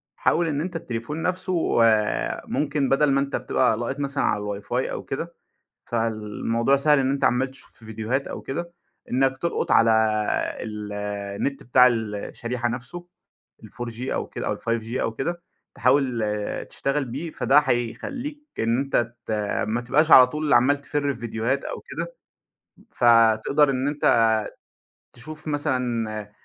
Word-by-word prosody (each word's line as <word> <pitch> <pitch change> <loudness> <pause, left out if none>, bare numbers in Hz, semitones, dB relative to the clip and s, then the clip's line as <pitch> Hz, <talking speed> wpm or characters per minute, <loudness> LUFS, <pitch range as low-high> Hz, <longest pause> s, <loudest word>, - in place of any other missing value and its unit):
حاول 170 0 +1
إن 145 -2 -1
أنت 175 +1 -5
التليفون 150 +1 -4
نفسه 180 -8 +1
آآ، 110 -2 +1
ممكن 145 -2 0
بدل 140 +1 +3
ما 135 - +3
أنت 140 0 -2
بتبقى 120 -4 +1
لاقط 120 +5 -3
مثلًا 140 0 -1
على 105 -1 -1
الWIFI - - -21 0.2
أو - - -5
كده، - - -5 0.5
فالموضوع 115 +2 0
سهل 150 +1 +4
إن 135 -1 +1
أنت 140 0 -1
عمّال 130 +2 +2
تشوف 135 - -13
في 115 - -15
فيديوهات 110 +5 -2
أو - - -6
كده، 170 +5 -5 0.4
إنك 135 +1 +1
تلقط 170 - -2
على 115 0 +5 0.7
ال 105 -1 -6
النت 105 +5 -3
بتاع 125 +1 +5
ال 110 -4 0
الشريحة 120 +3 -3
نفسه 130 +9 -6 0.6
ال4G 120 0 -7
أو - - -2
كده - - -6
أو - - -1
ال5G 115 +1 -3
أو 115 - -1
كده، 170 +8 -3 0.3
تحاول 130 -5 +2 0.5
تشتغل 140 +1 -1
بيه 140 +7 -5
فده 140 -1 +3
هيخليك 245 - -2 0.2
إن 115 +2 +1
أنت 120 -4 0
ت - - -6 0.4
ما 115 +2 0
تبقاش 145 +7 +2
على 130 -3 +10
طول 150 +3 -2
عمّال 140 +4 +4
تفرّ 145 -1 -1
في 120 - -13
فيديوهات 120 +3 -1
أو - - -5
كده، - - -6 0.8
فتقدر 115 +4 +4
إن 130 +1 -1
أنت 145 -5 +3 0.9
تشوف 155 +6 -9
مثلًا 120 -8 -2
130 Hz, 150 wpm, -24 LUFS, 115-145 Hz, 0.9 s, على